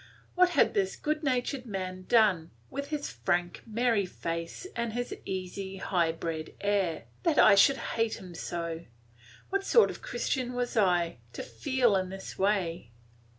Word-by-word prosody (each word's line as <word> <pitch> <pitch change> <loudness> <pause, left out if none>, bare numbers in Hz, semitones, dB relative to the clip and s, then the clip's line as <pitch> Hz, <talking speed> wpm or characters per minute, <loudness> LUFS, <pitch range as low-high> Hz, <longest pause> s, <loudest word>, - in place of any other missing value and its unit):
What 365 0 +5
had - - +5
this 195 -2 0
good 305 0 -2
natured 255 -2 -1
man 185 -2 -5
done, 200 -8 +4 0.2
with 280 +1 -4
his 295 -1 -3
frank, 175 -2 -1
merry 225 -3 +1
face 165 - -5
and 235 -1 -2
his 245 +1 -3
easy, 190 +1 -4
high 175 -3 +1
bred 160 -1 -5
air, 200 -5 0 0.2
that 330 -4 +1
I 215 - +8
should 270 +8 +6 0.2
hate 225 -1 +1
him 180 -2 -10
so? 170 0 -4 0.7
What 395 0 0
sort 460 +3 +5
of - - -10
Christian 260 - -2
was 245 0 -2
I, 175 - +2
to - - -5
feel 220 - +1
in 185 -1 0
this 190 0 -7
way? 185 - 0
200 Hz, 155 wpm, -29 LUFS, 175-245 Hz, 0.7 s, I